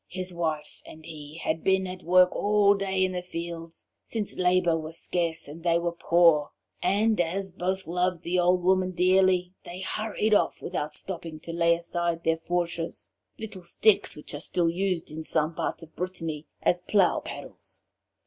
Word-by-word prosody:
His 185 0 -3
wife 160 -3 -3
and 155 0 -13
he 150 0 -9
had 160 +1 -1
been 190 0 +3
at 185 0 -6
work 180 +1 +5
all 205 -1 +4
day 195 -1 0
in 185 - -2
the 180 -1 -3
fields, 170 -1 -7 0.2
since 215 -3 -3
labour 180 -2 +3
was 160 0 -4
scarce 165 -3 -2
and 155 +4 -9
they 170 0 +3
were 170 0 -1
poor, 170 -3 +4 0.3
and 210 0 +2
as 190 +3 -2
both 190 +2 -2
loved 180 0 -1
the 180 +1 0
old 180 0 +3
woman 185 0 +2
dearly, 185 0 +3
they 180 +2 -8
hurried 215 +2 -1
off 205 - +2
without 150 -4 -4
stopping 165 -4 -6
to 165 - -7
lay 170 0 +3
aside 170 0 -2
their 165 0 +2
fourches 170 0 -2 0.3
little 210 -4 -7
sticks 205 +4 +2
which 150 - -6
are 145 - -4
still 165 +1 +1
used 180 -2 -1
in 155 +1 -5
some 155 0 0
parts 165 - -3
of 160 -1 -15
Brittany 165 -4 -4 0.2
as 175 0 +2
'plough 190 0 +3
paddles.' - - -10
175 Hz, 175 wpm, -27 LUFS, 165-185 Hz, 0.3 s, work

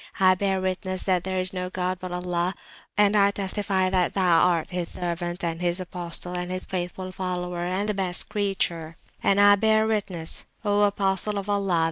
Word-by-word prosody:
I 185 -1 +6
bear 190 0 0
Witness 185 0 -2
that 185 -2 +1
there 190 0 -2
is 185 0 -2
no 180 -1 -3
god 185 0 -2
but 185 - -5
the 180 - -5
God 180 0 -5
(Allah), 180 +1 -1 0.4
and 205 0 +4
I 200 -1 +5
testify 195 -1 0
that 185 -2 +1
Thou 180 -4 +4
art 175 -1 +2
His 180 -2 -3
Servant, 175 0 -4
and 165 0 -2
His 175 +1 +1
Apostle, 180 -1 -3
and 180 0 -3
His 185 0 -4
Faithful 185 0 -4
Follower, 180 -2 -3
and 200 +3 -1
Best 185 -2 +1
Creature. 175 -5 -1 0.2
And 200 - +3
I 205 0 +8
bear 220 +1 +3
Witness, 200 -7 -2 0.2
O 205 0 +2
Apostle 200 0 +1
of 200 0 -4
Allah! 200 -4 +1
185 Hz, 190 wpm, -25 LUFS, 180-200 Hz, 0.4 s, I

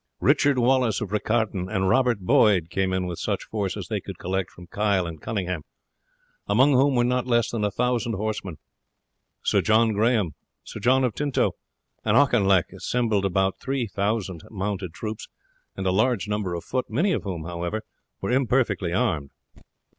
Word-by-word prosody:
Richard 140 -1 +3
Wallace 125 -2 +2
of 105 -3 -5
Riccarton 105 -3 0
and 95 -3 +1
Robert 125 0 +2
Boyd 100 - +3
came 95 -1 0
in 95 0 0
with 90 -2 -5
such - - -2
force 100 -4 -3
as - - -6
they - - -2
could - - -8
collect 95 0 -2
from 90 - -13
Kyle 100 0 0
and 80 -3 -7
Cunningham, 90 -6 -3 0.9
among 140 +2 +4
whom 135 +1 +4
were 120 - +3
not 125 +1 0
less 120 -2 +2
than 115 - -2
1000 120 +3 0
horsemen. 100 -5 -3 0.9
Sir - - +2
John 110 0 +3
Grahame, 105 -4 +2 0.3
Sir - - -8
John 130 +2 +3
of 125 -4 +1
Tinto, 145 -2 0 0.5
and 110 +1 +3
Auchinleck 100 - +3
assembled 110 -5 0
about 95 0 +1
3000 105 - -2
mounted 100 -3 -3
troops 110 +4 -6 0.5
and 95 - -3
a 95 - +2
large 110 +2 +1
number 105 -4 -2
of 85 - -5
foot, 130 0 -2
many 165 - +1
of 160 - 0
whom, 90 -5 -5
however, 85 +5 -4 0.4
were - - -2
imperfectly 125 -8 +1
armed. 90 - 0
105 Hz, 165 wpm, -25 LUFS, 95-125 Hz, 0.9 s, among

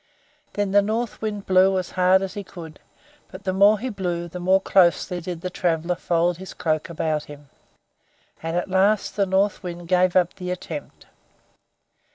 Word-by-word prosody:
Then 205 -1 -1
the 205 +1 +5
North 220 +3 -3
Wind 210 -2 -4
blew 190 +1 +4
as 185 -1 -3
hard 185 +1 +3
as 190 -1 -4
he 205 -1 -5
could, 170 -5 -11 0.5
but 185 +1 -11
the 190 -2 -1
more 200 +3 +5
he 255 +5 -4
blew 175 -5 -3
the 180 +2 -8
more 185 +2 +3
closely 180 -2 +2
did 175 -1 -6
the 185 0 -4
traveler 170 -1 0
fold 170 0 0
his 190 +1 -10
cloak 155 -1 -1
around 155 -2 -2
him; 145 -1 -13 0.9
and 165 +1 -2
at 175 - -1
last 195 +2 +2
the 200 -2 +1
North 195 +2 +1
Wind 175 -1 -7
gave 180 0 +2
up 180 -2 +3
the 180 -2 -7
attempt. 170 -4 -7
185 Hz, 180 wpm, -23 LUFS, 170-195 Hz, 0.9 s, the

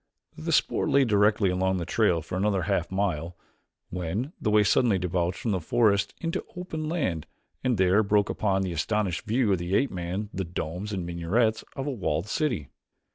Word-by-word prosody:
The - - -4
spoor - - +2
lay 140 -1 +4
directly 105 -2 +3
along 95 +1 +1
the 85 - -3
trail 90 -5 +2
for 90 - -6
another 95 -1 +1
half 85 +1 0
mile 90 -3 -2 0.5
when 95 - -3
the - - +1
way 105 0 +5
suddenly 105 0 +3
debouched 90 0 -1
from 115 - -2
the 95 - +1
forest 105 +2 +2
into 165 -1 -2
open 160 -4 -4
land 115 - -1 0.4
and 125 -3 +1
there 95 +2 +4
broke 105 -1 +2
upon 95 -2 0
the 90 -2 -2
astonished 95 +2 -1
view 115 -1 +2
of 95 - +2
the 85 +3 -1
ape 135 - +2
man 95 +4 -4
the 95 - -2
domes 90 +3 -4
and 95 -4 -3
minarets 100 +7 0
of 135 - -3
a 145 - -1
walled 95 - -1
city. 105 - -1
100 Hz, 185 wpm, -27 LUFS, 90-110 Hz, 0.5 s, way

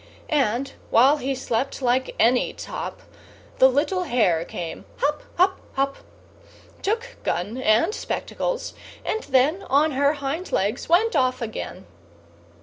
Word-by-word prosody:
And, 270 -3 +1 0.2
while 270 +6 +5
he 270 0 -2
slept 255 0 -2
like 255 0 0
any 245 +2 +3
top, - - -6 0.6
The 260 - +8
little 335 +8 0
hare 185 - +2
came, 170 -2 -6
hop, 295 +1 0 0.2
hop, 375 +2 +3
hop, 275 0 0 0.8
Took 465 +4 -2
gun 205 +9 -2
and 230 - +3
spectacles, - - -3 0.3
and 440 - -1
then 280 +7 +3
On 295 +4 +4
her 280 +2 +2
hind 285 +5 -4
legs 210 +10 -1
went 370 +5 +4
off 255 -2 +2
again. 215 -5 -6
270 Hz, 130 wpm, -24 LUFS, 245-315 Hz, 0.8 s, The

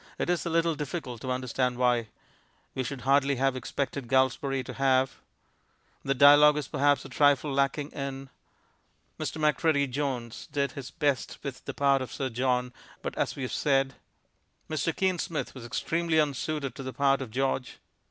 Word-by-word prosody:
It - - 0
is 175 0 -1
a - - 0
little 165 0 +2
difficult 145 -5 -5
to 130 - -5
understand 125 0 -1
why.... 120 -2 +2 0.7
We 130 - -2
should 130 +1 -5
hardly 140 +1 +3
have 135 +1 +1
expected 135 0 -3
Galsbarrie 130 +1 +1
to - - -7
have... 130 -1 +2 0.9
The 135 - 0
dialogue 145 +2 +7
is 145 -4 -3
perhaps 145 0 +2
a - - -8
trifle 145 0 +3
lacking 140 +2 0
in... 135 -1 -6 0.9
Mr. 160 - -3
Macready 150 -1 +2
Jones 130 -4 -4
did 140 -2 0
his 135 -2 -7
best 145 -5 -1
with 135 -3 -6
the - - -5
part 140 -1 +3
of 130 - -5
Sir 135 -1 -3
John, 125 +1 0 0.3
but - - -4
as - - -1
we 135 - -5
have 130 - -3
said... 135 -2 +2 0.7
Mr. 155 +1 -1
Kean 185 -2 +1
Smith 160 -1 -3
was 125 -3 -9
extremely 165 +6 0
unsuited 145 -2 -1
to 140 - -8
the 130 -1 -5
part 140 -1 +2
of 130 - -5
George.... 130 +1 -1
135 Hz, 170 wpm, -28 LUFS, 130-145 Hz, 0.9 s, dialogue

